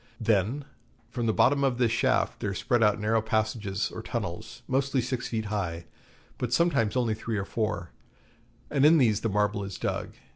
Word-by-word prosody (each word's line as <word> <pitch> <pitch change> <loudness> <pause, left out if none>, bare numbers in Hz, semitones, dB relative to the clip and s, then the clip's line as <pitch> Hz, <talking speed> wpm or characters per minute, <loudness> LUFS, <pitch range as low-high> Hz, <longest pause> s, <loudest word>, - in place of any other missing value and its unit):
Then 115 +5 +1 0.5
from 120 -3 -2
the - - +4
bottom 130 +6 +3
of 130 -3 +1
this 120 -3 +2
shaft 115 - +1
there 100 -2 -2
spread 120 +4 +1
out 105 -1 +3
narrow 110 +1 +2
passages 110 -2 -1
or - - -6
tunnels, - - -5
mostly 135 +1 +1
six 125 0 -2
feet 110 -2 -2
high, 90 -5 -3 0.5
but 125 - -2
sometimes 135 -8 +2
only 120 -3 +1
three 110 0 -3
or 100 - -2
four, 105 -6 -2 0.8
and 140 -2 +2
in 160 +3 +7
these 115 -8 +3
the 115 - 0
marble 105 0 0
is 95 -3 -6
dug. - - -3
110 Hz, 180 wpm, -28 LUFS, 105-125 Hz, 0.8 s, in